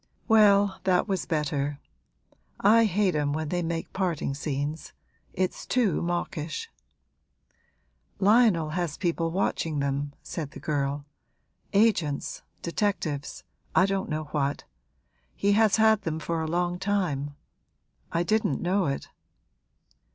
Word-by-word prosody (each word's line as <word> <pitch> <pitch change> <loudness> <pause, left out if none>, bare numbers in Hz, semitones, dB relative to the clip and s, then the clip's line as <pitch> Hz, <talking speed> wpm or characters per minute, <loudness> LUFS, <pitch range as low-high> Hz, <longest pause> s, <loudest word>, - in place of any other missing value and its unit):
'Well, 205 -3 +5
that 185 +1 +2
was 190 -3 -2
better. 145 -2 -1 0.8
I 225 +3 +6
hate 200 -2 +2
'em 145 -1 0
when 155 0 -2
they 175 +1 0
make 165 -1 -3
parting 175 -7 -1
scenes: 145 +2 -4 0.4
it's 185 0 -2
too 230 -10 +1
mawkish!' 175 - -3 1.5
'Lionel 200 -6 +4
has 175 -2 -2
people 170 -3 0
watching 165 -3 -1
them,' 140 0 -1
said 155 -4 -5
the - - -9
girl; 140 -1 -2 0.7
'agents, 195 -9 +1 0.2
detectives, 170 -6 -2 0.3
I 185 - +6
don't 195 0 -1
know 155 0 -2
what. 140 -1 -1 0.7
He 200 - +2
has 215 0 +4
had 220 -1 +4
them 160 -4 -2
for 165 0 -2
a 160 - -2
long 175 +1 0
time; 175 -8 -1 0.8
I 170 - +1
didn't 215 -7 +1
know 185 +1 +1
it.' 140 - -3
170 Hz, 120 wpm, -27 LUFS, 150-200 Hz, 1.5 s, I